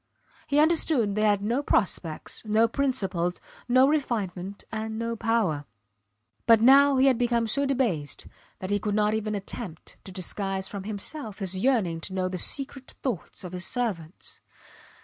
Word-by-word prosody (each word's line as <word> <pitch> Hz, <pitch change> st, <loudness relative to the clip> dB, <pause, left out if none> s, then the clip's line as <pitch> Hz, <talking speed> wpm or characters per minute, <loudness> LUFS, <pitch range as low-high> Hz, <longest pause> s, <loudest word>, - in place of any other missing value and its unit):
He 285 Hz, -, +1 dB
understood 305 Hz, -8 st, +3 dB
they 215 Hz, -, 0 dB
had 205 Hz, -2 st, +3 dB
no 235 Hz, +6 st, +1 dB
prospects, 175 Hz, -, -1 dB
no 220 Hz, +1 st, +3 dB
principles 195 Hz, -10 st, -1 dB, 0.3 s
no 255 Hz, +2 st, +6 dB
refinement 205 Hz, -10 st, -2 dB
and 220 Hz, 0 st, -4 dB
no 230 Hz, 0 st, -2 dB
power. 215 Hz, -10 st, 0 dB, 0.8 s
But 230 Hz, -1 st, +7 dB
now 275 Hz, +4 st, +6 dB
he 260 Hz, -, +5 dB
had 260 Hz, -3 st, +4 dB
become 240 Hz, -1 st, +2 dB
so 280 Hz, +6 st, +1 dB
debased 215 Hz, -, -1 dB, 0.3 s
that 190 Hz, +1 st, -5 dB
he 205 Hz, -, +2 dB
could 205 Hz, +1 st, -1 dB
not 210 Hz, 0 st, +2 dB
even 215 Hz, -1 st, -1 dB
attempt 195 Hz, -3 st, -6 dB
to 190 Hz, -, -7 dB
disguise 190 Hz, +1 st, -2 dB
from 200 Hz, -2 st, -7 dB
himself 215 Hz, +2 st, -4 dB
his 190 Hz, -3 st, -2 dB
yearning 185 Hz, -7 st, +1 dB
to 190 Hz, -, -4 dB
know 185 Hz, -1 st, 0 dB
the 185 Hz, -1 st, -3 dB
secret 270 Hz, -, -2 dB
thoughts 230 Hz, -, -4 dB
of 180 Hz, -, -7 dB
his 180 Hz, 0 st, -4 dB
servants. 195 Hz, -9 st, -4 dB
215 Hz, 160 wpm, -27 LUFS, 190-250 Hz, 0.8 s, But